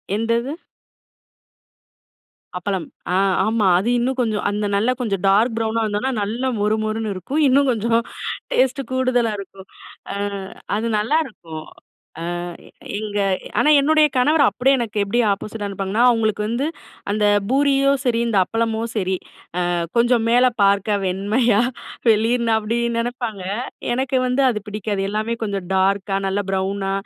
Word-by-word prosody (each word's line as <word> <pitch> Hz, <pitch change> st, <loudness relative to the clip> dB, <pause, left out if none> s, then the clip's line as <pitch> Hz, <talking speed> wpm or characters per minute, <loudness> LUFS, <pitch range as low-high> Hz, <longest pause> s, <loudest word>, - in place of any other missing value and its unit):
எந்தது? 230 Hz, +4 st, 0 dB, 2.1 s
அப்பளம். 190 Hz, -1 st, -2 dB, 0.3 s
அ -, -, +2 dB, 0.3 s
ஆமா. 220 Hz, -2 st, +2 dB
அது 200 Hz, +6 st, 0 dB
இன்னும் 255 Hz, +2 st, 0 dB
கொஞ்சம் 215 Hz, -3 st, -1 dB
அந்த 205 Hz, 0 st, -2 dB
நல்ல 215 Hz, +5 st, +2 dB
கொஞ்சம் 200 Hz, -6 st, -1 dB
டார்க் 220 Hz, +5 st, +4 dB
ப்ரௌனா 225 Hz, 0 st, 0 dB
இருந்தோம்னா. 215 Hz, +5 st, -1 dB
நல்லா 230 Hz, +6 st, -2 dB
மொறு 210 Hz, +1 st, +2 dB
மொறுன்னு 215 Hz, 0 st, -2 dB
இருக்கும். 260 Hz, -, -2 dB
இன்னும் 275 Hz, +1 st, +4 dB
கொஞ்சம் 230 Hz, +1 st, +1 dB, 0.5 s
டேஸ்ட்டு 265 Hz, +1 st, +2 dB
கூடுதலா 255 Hz, -3 st, +1 dB
இருக்கும். 195 Hz, -1 st, -10 dB, 0.5 s
அ, -, -, -4 dB, 0.6 s
அது 225 Hz, +3 st, -1 dB
நல்லாருக்கும். 210 Hz, -, -2 dB, 0.8 s
அ -, -, -5 dB, 0.6 s
எங்க 210 Hz, -1 st, -3 dB, 0.4 s
ஆனா 300 Hz, -, +4 dB
என்னுடைய 305 Hz, +1 st, +4 dB
கணவர் 295 Hz, +4 st, +4 dB
அப்டியே 250 Hz, +7 st, +2 dB
எனக்கு 220 Hz, -3 st, -4 dB
எப்படி 205 Hz, +5 st, 0 dB
ஆப்போசிட்டா 205 Hz, +1 st, -5 dB
இருப்பாங்கன்னா, 195 Hz, +3 st, -1 dB
அவங்களுக்கு 220 Hz, -3 st, +1 dB
வந்து 235 Hz, +6 st, -1 dB, 0.5 s
அந்த 210 Hz, 0 st, +1 dB, 0.2 s
பூரியும் 275 Hz, 0 st, +3 dB
சரி, 235 Hz, -2 st, +2 dB
இந்த 220 Hz, -4 st, +1 dB
அப்பளமும் 225 Hz, 0 st, -1 dB
சரி 190 Hz, -2 st, 0 dB, 0.5 s
அ -, -, 0 dB, 0.3 s
கொஞ்சம் 235 Hz, -1 st, +3 dB
மேல 245 Hz, +2 st, +5 dB, 0.2 s
பார்க்க 200 Hz, +1 st, +2 dB
வெண்மையா, 205 Hz, +4 st, +2 dB, 0.5 s
வெளிர்ன்னு 230 Hz, +2 st, +2 dB
அப்டி 220 Hz, +2 st, -1 dB, 0.2 s
நெனப்பாங்க. 230 Hz, -4 st, -3 dB, 0.5 s
எனக்கு 265 Hz, +1 st, 0 dB
வந்து 250 Hz, +2 st, +1 dB
அது 215 Hz, -3 st, -1 dB
பிடிக்காது, 210 Hz, -1 st, -3 dB
எல்லாமே 215 Hz, +2 st, -1 dB
கொஞ்சம் 200 Hz, -4 st, -3 dB
டார்க்கா 195 Hz, +1 st, +1 dB
நல்லா 200 Hz, +1 st, -1 dB
ப்ரௌனா. 195 Hz, +1 st, -1 dB
220 Hz, 135 wpm, -21 LUFS, 200-245 Hz, 2.1 s, மேல